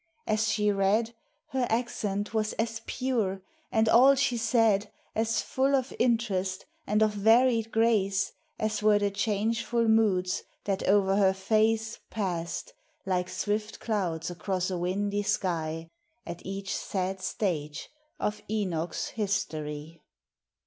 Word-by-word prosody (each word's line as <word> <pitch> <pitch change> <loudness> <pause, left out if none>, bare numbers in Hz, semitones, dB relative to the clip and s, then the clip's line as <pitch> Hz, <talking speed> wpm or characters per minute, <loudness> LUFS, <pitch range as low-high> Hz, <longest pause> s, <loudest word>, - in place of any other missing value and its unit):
As 215 0 +1
she 210 -1 +2
read, 205 +4 +1 0.4
Her 260 -2 0
accent 215 -3 -1
was 215 -1 0
as 225 0 -2
pure, 220 -7 -1 0.3
and 225 -2 +3
all 255 +5 +7
she 255 -2 +1
said 225 -3 +2 0.2
As 225 +1 0
full 270 +1 +1
of 260 -1 -1
interest 200 -6 0 0.2
and 210 +1 +3
of 215 - +3
varied 225 +2 +4
grace 205 -4 +2 0.2
As 215 0 -1
were 210 -1 +5
the 205 -1 0
changeful 225 +3 0
moods, 205 -5 +2 0.2
that 195 -1 -2
o'er 195 -1 +4
her 190 -2 +4
face 220 +3 +1
Passed, 175 -5 -3 0.3
like 180 -1 0
swift 210 +1 -2
clouds 180 -7 -2
across 185 +1 -2
a 180 - -1
windy 200 +3 0
sky, 165 -5 -1 0.4
At 170 0 -7
each 195 +1 -4
sad 190 0 -3
stage 155 -7 -3 0.3
of 210 - -2
Enoch's 180 -6 -2
history. 160 -7 -3
205 Hz, 130 wpm, -28 LUFS, 190-225 Hz, 0.4 s, all